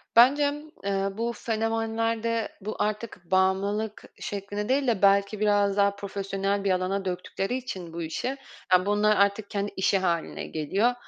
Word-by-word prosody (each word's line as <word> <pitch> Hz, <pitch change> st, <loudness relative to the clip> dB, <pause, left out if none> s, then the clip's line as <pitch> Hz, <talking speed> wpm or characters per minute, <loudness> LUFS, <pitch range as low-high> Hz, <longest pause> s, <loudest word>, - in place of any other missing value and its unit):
Bence 265 Hz, +5 st, +7 dB
m -, -, -5 dB, 0.3 s
eee, 195 Hz, 0 st, 0 dB
bu 235 Hz, +1 st, -1 dB
fenomenlerde 225 Hz, 0 st, -1 dB
bu 215 Hz, +3 st, -4 dB
artık 210 Hz, -4 st, -3 dB
bağımlılık 200 Hz, +3 st, +1 dB, 0.2 s
şeklinde 205 Hz, +1 st, -4 dB
değil 270 Hz, 0 st, +2 dB
de 225 Hz, -5 st, +1 dB
belki 200 Hz, +1 st, +4 dB
biraz 205 Hz, -1 st, +2 dB
daha 200 Hz, 0 st, +3 dB
profesyonel 195 Hz, 0 st, -2 dB
bir 195 Hz, -, +2 dB
alana 185 Hz, +2 st, 0 dB
döktükleri 190 Hz, +5 st, -2 dB
için 185 Hz, -10 st, -6 dB
bu 170 Hz, -, -4 dB
işi, 255 Hz, +12 st, -3 dB, 0.3 s
aaa, 185 Hz, 0 st, +5 dB
bunlar 210 Hz, +1 st, +3 dB
artık 200 Hz, +1 st, +2 dB
kendi 205 Hz, 0 st, -2 dB
işi 190 Hz, +1 st, +3 dB
hâline 170 Hz, -3 st, -1 dB
geliyor. 195 Hz, +10 st, +1 dB
200 Hz, 150 wpm, -27 LUFS, 195-225 Hz, 0.3 s, Bence